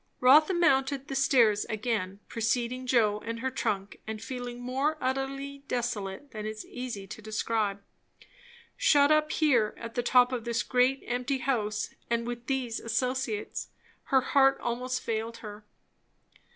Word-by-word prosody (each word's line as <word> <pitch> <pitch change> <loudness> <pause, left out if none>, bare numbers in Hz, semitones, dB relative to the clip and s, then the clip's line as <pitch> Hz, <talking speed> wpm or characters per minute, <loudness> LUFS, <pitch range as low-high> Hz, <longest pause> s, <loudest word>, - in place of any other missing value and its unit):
Rotha 300 +8 +6
mounted 275 -5 +2
the 270 - -3
stairs 240 -6 +4
again, 210 -3 -2
preceding 240 +2 -1
Joe 215 -5 +3
and 230 0 -4
her 260 0 -1
trunk, 200 -6 -2
and 220 0 -4
feeling 245 +1 -6
more 265 +5 -1
utterly 275 +1 -3
desolate 240 0 -3
than 215 -2 -6
it 215 - -3
is 215 0 -7
easy 245 -6 -6
to 195 - -9
describe. 215 -2 -1 0.9
Shut 285 0 +5
up 305 0 +3
here, 250 -11 +2
at 230 0 -7
the 245 - 0
top 250 +1 +4
of 245 -3 -2
this 235 0 -1
great 255 +2 +2
empty 250 +3 -1
house, 215 -6 -1 0.2
and 235 0 0
with 240 0 -6
these 255 -4 -1
associates! 235 -2 -2 0.4
Her 265 -1 +3
heart 275 -2 +4
almost 250 +1 -2
failed 230 +1 -3
her. 210 0 -9
245 Hz, 150 wpm, -29 LUFS, 220-265 Hz, 0.9 s, Rotha